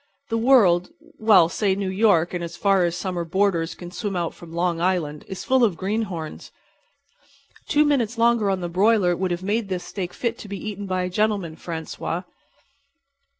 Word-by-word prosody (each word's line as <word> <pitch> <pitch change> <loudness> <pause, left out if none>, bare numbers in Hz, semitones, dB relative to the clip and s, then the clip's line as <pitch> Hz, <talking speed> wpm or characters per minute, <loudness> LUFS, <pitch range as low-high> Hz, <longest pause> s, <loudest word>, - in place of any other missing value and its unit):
The 225 - 0
world—well, 220 - +4
say 195 +2 0
New 195 -1 -2
York 190 -4 +3
and 175 -1 -3
as 170 0 -7
far 195 -3 +3
as 170 0 -2
summer 180 -1 -3
boarders 170 -1 0
can 175 -1 -9
swim 205 0 -4
out 170 -2 -2
from 170 -1 -13
Long 170 0 -1
Island—is 175 0 -2
full 260 -1 +3
of 200 -8 +2
greenhorns. 190 -5 -4 1.2
Two 300 0 +3
minutes 245 -6 +1
longer 230 -3 +3
on 190 -1 -1
the 175 - -2
broiler 185 0 +3
would 185 +1 -1
have 175 +1 -3
made 205 +1 -1
this 180 -2 -3
steak 180 -3 -5
fit 235 -1 -2
to - - -9
be 200 0 -5
eaten 205 -1 -6
by 185 -1 -1
a 180 - -2
gentleman, 200 -5 0
Francois." 165 +1 -5
190 Hz, 175 wpm, -23 LUFS, 175-215 Hz, 1.2 s, world—well